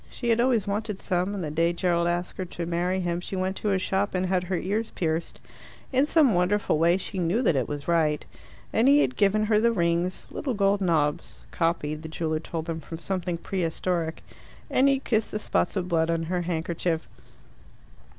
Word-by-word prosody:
She 240 Hz, -, -4 dB
had 230 Hz, 0 st, +3 dB
always 240 Hz, -5 st, +2 dB
wanted 210 Hz, 0 st, -2 dB
some, 185 Hz, +3 st, -1 dB
and 190 Hz, -, -3 dB
the 150 Hz, -, -3 dB
day 165 Hz, +2 st, +2 dB
Gerald 170 Hz, -1 st, +1 dB
asked 175 Hz, +1 st, -2 dB
her 185 Hz, -, -1 dB
to 170 Hz, -1 st, -5 dB
marry 175 Hz, +2 st, 0 dB
him 175 Hz, -1 st, -1 dB
she 190 Hz, -, -5 dB
went 185 Hz, +1 st, -1 dB
to 210 Hz, -, -1 dB
a 195 Hz, -, +2 dB
shop 190 Hz, +1 st, -1 dB
and 185 Hz, 0 st, +1 dB
had 185 Hz, -1 st, 0 dB
her 185 Hz, 0 st, -1 dB
ears 210 Hz, +6 st, -1 dB
pierced. 165 Hz, -1 st, -2 dB, 0.5 s
In 265 Hz, +3 st, +3 dB
some 300 Hz, -8 st, +4 dB
wonderful 180 Hz, -2 st, +1 dB
way 170 Hz, +2 st, +4 dB
she 190 Hz, 0 st, -5 dB
knew 180 Hz, +8 st, +1 dB
that 175 Hz, -, +3 dB
it 130 Hz, -3 st, 0 dB
was 145 Hz, -1 st, -5 dB
right. 160 Hz, -3 st, +2 dB, 0.5 s
And 230 Hz, +3 st, +3 dB
he 285 Hz, +1 st, +6 dB
had 255 Hz, -, 0 dB
given 210 Hz, +1 st, +3 dB
her 215 Hz, 0 st, +3 dB
the 235 Hz, +2 st, +3 dB
rings 170 Hz, -2 st, 0 dB
little 265 Hz, -5 st, -3 dB
gold 200 Hz, 0 st, +2 dB
knobs, 155 Hz, -5 st, 0 dB
copied, 155 Hz, -3 st, -1 dB
the 160 Hz, -, -7 dB
jeweller 155 Hz, -1 st, -2 dB
told 160 Hz, 0 st, -5 dB
them, 165 Hz, -1 st, -3 dB
from 165 Hz, +1 st, -8 dB
something 175 Hz, 0 st, -3 dB
prehistoric 170 Hz, -2 st, -2 dB, 0.5 s
and 265 Hz, -, +4 dB
he 275 Hz, -, +4 dB
had 270 Hz, -, -6 dB
kissed 220 Hz, -2 st, +1 dB
the -, -, 0 dB
spots 210 Hz, -, 0 dB
of 185 Hz, -2 st, -1 dB
blood 165 Hz, -2 st, +1 dB
on 165 Hz, 0 st, 0 dB
her 175 Hz, +2 st, -1 dB
handkerchief. 170 Hz, -1 st, -2 dB
180 Hz, 210 wpm, -26 LUFS, 165-205 Hz, 0.5 s, he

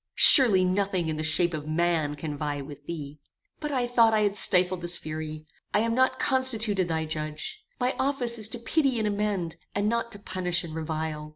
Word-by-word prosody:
Surely 215 Hz, -9 st, +9 dB
nothing 185 Hz, -2 st, -1 dB
in 155 Hz, -, -3 dB
the 155 Hz, -, -3 dB
shape 160 Hz, +2 st, +1 dB
of 150 Hz, -1 st, -6 dB
man 160 Hz, -2 st, -1 dB
can 150 Hz, 0 st, -6 dB
vie 145 Hz, 0 st, -4 dB
with 145 Hz, +1 st, -11 dB
thee! 150 Hz, -3 st, -7 dB, 0.4 s
"But 300 Hz, -1 st, -5 dB
I 255 Hz, -3 st, -1 dB
thought 230 Hz, -2 st, +3 dB
I 215 Hz, -, +1 dB
had 205 Hz, -1 st, 0 dB
stifled 185 Hz, -2 st, +2 dB
this 175 Hz, +1 st, -4 dB
fury. 155 Hz, 0 st, -7 dB, 0.3 s
I 210 Hz, -, +3 dB
am 230 Hz, 0 st, -1 dB
not 260 Hz, +2 st, +1 dB
constituted 225 Hz, -8 st, +1 dB
thy 160 Hz, -1 st, -2 dB
judge. 155 Hz, -, -6 dB, 0.2 s
My 250 Hz, 0 st, 0 dB
office 255 Hz, -4 st, +1 dB
is 215 Hz, -, +3 dB
to 240 Hz, -, -7 dB
pity 265 Hz, +2 st, 0 dB
and 220 Hz, -1 st, -1 dB
amend, 200 Hz, -5 st, -3 dB, 0.2 s
and 205 Hz, +1 st, -1 dB
not 235 Hz, +1 st, -2 dB
to -, -, -8 dB
punish 185 Hz, -3 st, -2 dB
and 165 Hz, -2 st, -9 dB
revile. 155 Hz, -1 st, -5 dB
185 Hz, 200 wpm, -26 LUFS, 155-230 Hz, 0.4 s, Surely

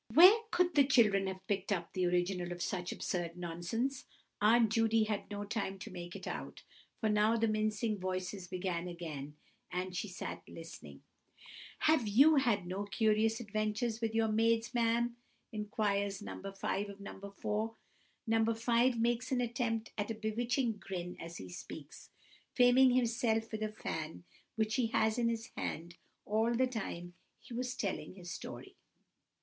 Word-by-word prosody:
Where 360 Hz, -, +10 dB
could 355 Hz, -2 st, +2 dB
the 285 Hz, -, +6 dB
children 215 Hz, -8 st, +4 dB
have 190 Hz, 0 st, -5 dB
picked 195 Hz, 0 st, -1 dB
up 170 Hz, -4 st, -1 dB
the 185 Hz, -1 st, +1 dB
original 175 Hz, 0 st, 0 dB
of 175 Hz, 0 st, -3 dB
such 180 Hz, -1 st, -2 dB
absurd 175 Hz, -1 st, -3 dB
nonsense? 180 Hz, +10 st, -2 dB, 0.4 s
Aunt 225 Hz, +1 st, +5 dB
Judy 225 Hz, 0 st, +4 dB
had 210 Hz, -2 st, -2 dB
no 205 Hz, 0 st, -4 dB
time 205 Hz, -2 st, -3 dB
to -, -, -8 dB
make 175 Hz, -1 st, -7 dB
it -, -, -7 dB
out, -, -, -6 dB, 0.4 s
for 220 Hz, -, +1 dB
now 215 Hz, +2 st, +3 dB
the 225 Hz, 0 st, +2 dB
mincing 215 Hz, 0 st, 0 dB
voices 185 Hz, 0 st, -3 dB
began 180 Hz, -1 st, -2 dB
again, 155 Hz, -5 st, -6 dB, 0.4 s
and 180 Hz, 0 st, -3 dB
she 185 Hz, -, -2 dB
sat 185 Hz, -, -6 dB
listening. 75 Hz, -, -10 dB, 0.8 s
"Have 310 Hz, -8 st, +4 dB
you 280 Hz, +9 st, +6 dB
had 235 Hz, -9 st, +2 dB
no 190 Hz, +3 st, -3 dB
curious 215 Hz, +2 st, +2 dB
adventures 215 Hz, +1 st, -1 dB
with 225 Hz, -1 st, -1 dB
your 225 Hz, 0 st, +3 dB
maids, 225 Hz, +1 st, +2 dB
ma'am?" 235 Hz, 0 st, +1 dB, 0.3 s
inquires 205 Hz, -2 st, -1 dB
No. 195 Hz, -1 st, -6 dB
5 195 Hz, +1 st, -2 dB
of 200 Hz, 0 st, -10 dB
No. 200 Hz, 0 st, -9 dB
4. 220 Hz, +2 st, -1 dB, 0.5 s
No. 225 Hz, -1 st, +3 dB
5 235 Hz, +1 st, +3 dB
makes 240 Hz, +2 st, +1 dB
an 255 Hz, -, +2 dB
attempt 235 Hz, -2 st, -1 dB
at 205 Hz, -, -1 dB
a 225 Hz, -, -2 dB
bewitching 230 Hz, +2 st, 0 dB
grin 180 Hz, -2 st, -5 dB
as 165 Hz, +1 st, -7 dB
he 95 Hz, -, -8 dB
speaks, 90 Hz, -, -9 dB, 0.5 s
fanning 250 Hz, +1 st, +6 dB
himself 230 Hz, -2 st, +1 dB
with 220 Hz, -1 st, -4 dB
a 215 Hz, 0 st, -1 dB
fan 160 Hz, -6 st, -5 dB, 0.3 s
which 220 Hz, +1 st, 0 dB
he 245 Hz, -3 st, +2 dB
has 220 Hz, 0 st, +2 dB
had -, -, +1 dB
in -, -, +4 dB
his 225 Hz, -1 st, -3 dB
hand 170 Hz, +2 st, -4 dB, 0.3 s
all 220 Hz, +3 st, +2 dB
the 260 Hz, +2 st, +4 dB
time 185 Hz, -8 st, -5 dB, 0.3 s
he -, -, -12 dB
was 250 Hz, +1 st, -2 dB
telling 195 Hz, -2 st, -3 dB
his 175 Hz, -3 st, -8 dB
story. -, -, -8 dB
215 Hz, 165 wpm, -34 LUFS, 185-230 Hz, 0.8 s, Where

